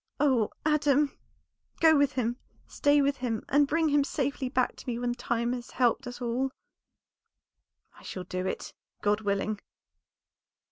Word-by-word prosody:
"Oh, 260 -7 +3 0.2
Adam! 295 -2 +3 0.6
go 320 -1 +6
with 285 -1 +3
him, 240 -1 -1 0.3
stay 290 0 +3
with 280 0 +1
him, 235 -4 -3
and 285 +1 +4
bring 320 +1 +2
him 290 -1 +4
safely 275 -2 -2
back 255 -1 +1
to - - -12
me 235 - -2
when 240 0 -1
time 235 0 -1
has 245 -1 -6
helped 245 +1 +1
us 245 0 -7
all." 250 +2 -1 1.5
"I - - -17
shall 185 - -6
do 185 +1 -3
it, - - -4 0.3
God 210 +1 +2
willing." 200 0 -1
250 Hz, 150 wpm, -29 LUFS, 235-285 Hz, 1.5 s, go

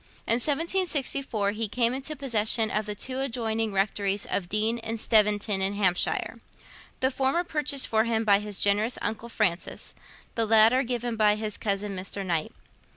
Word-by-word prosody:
In 230 - +3
1764 280 - 0
he 220 +1 -2
came 235 +2 +1
into 270 +4 -4
possession 225 -4 0
of 215 0 -1
the 210 - -4
two 260 +5 -3
adjoining 225 -4 -1
Rectories 200 0 0
of 175 -3 -2
Deane 220 +3 0
and 225 0 -4
Steventon 210 -2 +2
in 195 +1 +1
Hampshire; 190 -3 0 0.6
the 260 +1 +2
former 270 +6 0
purchased 295 -5 +1
for 220 0 +2
him 225 -1 0
by 200 -2 +4
his 210 -1 -6
generous 210 +4 +2
uncle 225 +2 -3
Francis, 185 -6 -2 0.4
the 230 -1 0
latter 225 +4 +5
given 240 -2 -3
by 210 -1 +4
his 215 -1 -4
cousin 200 -1 -2
Mr. 195 +1 -5
Knight. 165 -4 -1
220 Hz, 160 wpm, -27 LUFS, 205-250 Hz, 0.6 s, latter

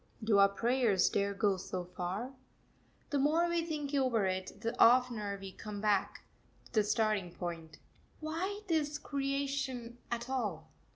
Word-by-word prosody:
Do 215 -2 +4
our 200 0 +7
prayers 230 -2 +2
dare 200 0 0
go 200 -1 +2
so 180 -1 -4
far? 180 +8 -4 0.8
The 285 - +2
more 315 +5 +3
we 340 -1 0
think 300 -3 -4
over 255 -7 +2
it, 190 +1 -3
the 230 0 -2
oftener 235 -5 +4
we 195 -1 -7
come 210 +1 -7
hack 205 -2 +1 0.4
to - - -18
the 215 -3 +3
starting 210 -4 +1
point 165 -3 -6 0.4
Why 355 +7 -3
this 300 -3 +1
creation 275 -4 -2
at 235 0 -3
all? 210 -12 -3
230 Hz, 150 wpm, -33 LUFS, 200-275 Hz, 0.8 s, our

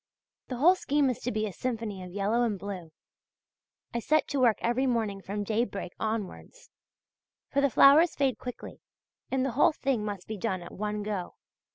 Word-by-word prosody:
The 255 - -4
whole 330 +8 +6
scheme 290 -6 +1
is 245 - -6
to 250 - -3
be 215 0 -1
a 205 - -5
symphony 225 -5 -4
of 180 - -8
yellow 205 +5 0
and 225 -4 +1
blue. 185 -4 -7 1.0
I 235 - 0
set 310 +5 +2
to 285 - -1
work 235 -5 +4
every 245 +3 +1
morning 220 -5 -1
from 205 +2 -4
daybreak 215 -3 -2
onwards; 220 - -5 0.8
for 280 - +2
the 280 - +3
flowers 300 +7 +6
fade 270 -3 +1
quickly 250 -1 -8 0.5
and 265 0 0
the 270 - -1
whole 290 +6 +4
thing 270 -7 -1
must 205 -3 -5
be 220 - -4
done 185 -3 -2
at 175 - -10
one 210 +1 -3
go. 205 -4 -4
225 Hz, 185 wpm, -29 LUFS, 205-265 Hz, 1.0 s, whole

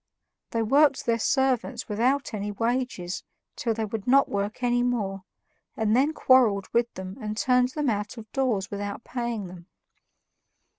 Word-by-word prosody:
They 230 -1 0
worked 275 +4 +3
their 230 -1 +1
servants 260 -1 0
without 245 +6 0
any 205 0 -3
wages 230 -4 -2 0.3
till 230 -2 -1
they 220 0 -1
would 215 0 -5
not 275 +2 +5
work 205 +4 -3
any 245 0 +2
more, 200 -6 -1 0.5
and 220 0 +2
then 275 +5 +3
quarreled 240 -10 +4
with 235 0 +2
them 190 0 -7
and 215 0 -4
turned 250 +1 +3
them 300 -2 -1
out 210 +3 -3
of 225 - -8
doors 235 -8 0
without 205 +2 -4
paying 235 -4 -3
them. 175 -1 -11
230 Hz, 155 wpm, -26 LUFS, 205-255 Hz, 0.5 s, not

